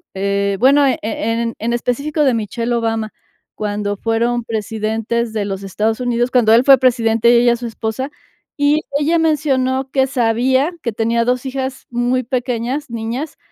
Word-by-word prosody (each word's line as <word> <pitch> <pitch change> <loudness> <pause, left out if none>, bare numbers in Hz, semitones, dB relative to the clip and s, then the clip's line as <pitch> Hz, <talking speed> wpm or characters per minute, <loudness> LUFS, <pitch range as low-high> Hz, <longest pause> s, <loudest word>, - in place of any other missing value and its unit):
eh, 200 0 0
bueno, 280 +3 +5
e 260 - +1
en 230 +1 -2
en 235 +2 -1
específico 280 +6 -1
de 265 -3 +3
Michelle 230 +2 -2
Obama, 225 -2 -2 0.4
cuando 205 -1 -2
fueron 235 +2 0
presidentes 225 +1 -2
de 210 -2 -1
los 195 -1 -4
Estados 215 +4 -1
Unidos, 245 0 0
cuando 235 -4 +4
él 235 +3 +5
fue 270 -1 +8
presidente 235 -2 +3
y - - +5
ella 240 -1 +4
su 235 0 -6
esposa, 225 +5 -4 0.5
y 295 +2 +3 0.2
ella 330 +3 +2
mencionó 270 -4 +1
que 265 -1 +3
sabía 260 +4 +1
que 235 - -1
tenía 230 +1 +1
2 250 +2 0
hijas 265 0 -4
muy 245 +1 0
pequeñas, 250 +2 -2
niñas, 235 +6 -4
235 Hz, 160 wpm, -18 LUFS, 225-260 Hz, 0.5 s, fue